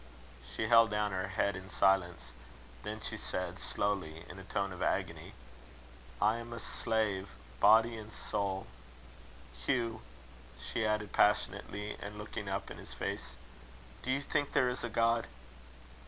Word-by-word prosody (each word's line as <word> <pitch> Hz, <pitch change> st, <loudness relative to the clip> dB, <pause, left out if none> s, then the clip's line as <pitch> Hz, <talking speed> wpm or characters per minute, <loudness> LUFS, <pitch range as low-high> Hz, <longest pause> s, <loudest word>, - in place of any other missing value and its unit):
She 110 Hz, -, 0 dB
held 115 Hz, 0 st, +7 dB
down 105 Hz, 0 st, +1 dB
her 95 Hz, +1 st, -1 dB
head 100 Hz, +1 st, +1 dB
in 95 Hz, +1 st, -8 dB
silence. 95 Hz, -6 st, +2 dB, 0.5 s
Then 105 Hz, +1 st, -5 dB
she 110 Hz, -, -4 dB
said, 90 Hz, -3 st, -3 dB
slowly, 90 Hz, -6 st, -1 dB
in 95 Hz, -, -9 dB
a -, -, -8 dB
tone 100 Hz, +1 st, -1 dB
of 90 Hz, -, -8 dB
agony: -, -, -1 dB, 0.9 s
"I 110 Hz, +2 st, +4 dB
am 115 Hz, 0 st, -7 dB
a 115 Hz, -, -5 dB
slave, 105 Hz, -4 st, 0 dB, 0.3 s
body 115 Hz, +3 st, +6 dB
and 110 Hz, 0 st, -8 dB
soul. 100 Hz, -3 st, -2 dB, 0.9 s
Hugh!" 115 Hz, -, -1 dB, 0.6 s
she 110 Hz, -, -1 dB
added, 105 Hz, -1 st, 0 dB
passionately, 105 Hz, 0 st, +2 dB
and 105 Hz, +1 st, -6 dB
looking 105 Hz, -1 st, -5 dB
up 95 Hz, 0 st, -3 dB
in -, -, -8 dB
his -, -, -9 dB
face, 65 Hz, -1 st, -4 dB, 0.7 s
"do -, -, -6 dB
you 140 Hz, +2 st, +1 dB
think 145 Hz, 0 st, 0 dB
there 125 Hz, -2 st, +4 dB
is 125 Hz, -, -5 dB
a 120 Hz, -, -1 dB
God?" 115 Hz, +1 st, +2 dB
105 Hz, 150 wpm, -33 LUFS, 95-115 Hz, 0.9 s, held